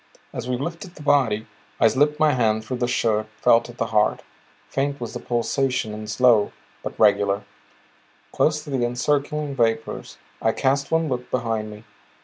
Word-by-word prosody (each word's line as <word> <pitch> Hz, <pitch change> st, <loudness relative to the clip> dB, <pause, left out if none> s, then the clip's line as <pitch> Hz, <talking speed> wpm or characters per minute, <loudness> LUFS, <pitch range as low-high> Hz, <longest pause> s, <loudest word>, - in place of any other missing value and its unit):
As 125 Hz, -, -5 dB
we 125 Hz, -, 0 dB
lifted 170 Hz, +6 st, -6 dB
the 150 Hz, -, -11 dB
body, 130 Hz, -7 st, +2 dB, 0.3 s
I 115 Hz, -, +6 dB
slipped 150 Hz, +5 st, +2 dB
my 155 Hz, -1 st, +5 dB
hand 110 Hz, -3 st, +1 dB
through 125 Hz, +3 st, -3 dB
the 120 Hz, 0 st, 0 dB
shirt, 110 Hz, -3 st, +1 dB
felt 115 Hz, +3 st, +4 dB
at 120 Hz, -, -12 dB
the 115 Hz, -, 0 dB
heart. 105 Hz, 0 st, +2 dB, 0.4 s
Faint 140 Hz, +1 st, -1 dB
was 115 Hz, -2 st, -5 dB
the 120 Hz, -, -4 dB
pulsation 125 Hz, -1 st, -1 dB
and 105 Hz, 0 st, -7 dB
slow, 110 Hz, -1 st, +4 dB, 0.3 s
but -, -, -7 dB
regular. 100 Hz, -1 st, +3 dB, 0.9 s
Close 150 Hz, 0 st, +1 dB
to 150 Hz, -, -9 dB
the 130 Hz, -3 st, 0 dB
encircling 140 Hz, +4 st, -1 dB
vapors 115 Hz, -2 st, -1 dB, 0.2 s
I 110 Hz, -, +2 dB
cast 140 Hz, 0 st, +1 dB
one 160 Hz, 0 st, +2 dB
look 125 Hz, -3 st, -3 dB
behind 115 Hz, -3 st, -1 dB
me. 105 Hz, +1 st, -11 dB
120 Hz, 170 wpm, -23 LUFS, 110-140 Hz, 0.9 s, I